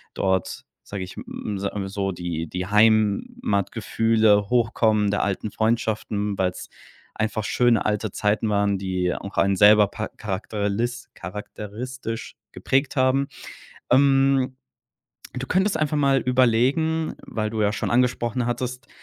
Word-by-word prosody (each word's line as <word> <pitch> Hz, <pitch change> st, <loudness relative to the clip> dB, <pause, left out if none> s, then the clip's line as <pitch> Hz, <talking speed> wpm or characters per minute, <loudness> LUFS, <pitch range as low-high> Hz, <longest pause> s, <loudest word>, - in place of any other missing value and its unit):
dort, 95 Hz, -2 st, -1 dB, 0.2 s
sage 100 Hz, -2 st, -6 dB
ich 90 Hz, -, -9 dB
m 105 Hz, -2 st, -5 dB
sa 100 Hz, 0 st, -2 dB, 0.2 s
so 95 Hz, 0 st, -2 dB
die 85 Hz, -2 st, -4 dB
die 90 Hz, +3 st, -4 dB
Heimatgefühle 110 Hz, -, +2 dB
hochkommen 110 Hz, -3 st, +2 dB
der 105 Hz, -, 0 dB
alten 100 Hz, +1 st, -2 dB
Freundschaften, 110 Hz, -2 st, -1 dB
weil's 90 Hz, -1 st, -2 dB, 0.5 s
einfach 110 Hz, 0 st, -1 dB
schöne 120 Hz, -2 st, +2 dB
alte 105 Hz, -1 st, -1 dB
Zeiten 105 Hz, +1 st, 0 dB
waren, 100 Hz, -1 st, +1 dB
die 90 Hz, -2 st, -1 dB
auch 100 Hz, -, -8 dB
einen 100 Hz, 0 st, +3 dB
selber 105 Hz, +1 st, +6 dB
pa 110 Hz, +1 st, -5 dB
charaktelis 105 Hz, +4 st, -3 dB
charakteristisch 110 Hz, +5 st, -7 dB, 0.2 s
geprägt 135 Hz, +2 st, 0 dB
haben. 130 Hz, +1 st, +2 dB, 0.6 s
Ähm, 135 Hz, 0 st, +3 dB, 0.8 s
du 130 Hz, +1 st, -5 dB
könntest 190 Hz, +2 st, +1 dB
einfach 150 Hz, -1 st, 0 dB
mal 140 Hz, -2 st, +3 dB
überlegen, 130 Hz, +6 st, +2 dB
weil 110 Hz, -1 st, -3 dB
du 110 Hz, -1 st, -2 dB
ja 105 Hz, -, +2 dB
schon 105 Hz, -, -3 dB
angesprochen 120 Hz, -1 st, +1 dB
hattest, 125 Hz, +2 st, -3 dB
110 Hz, 125 wpm, -23 LUFS, 100-125 Hz, 0.8 s, selber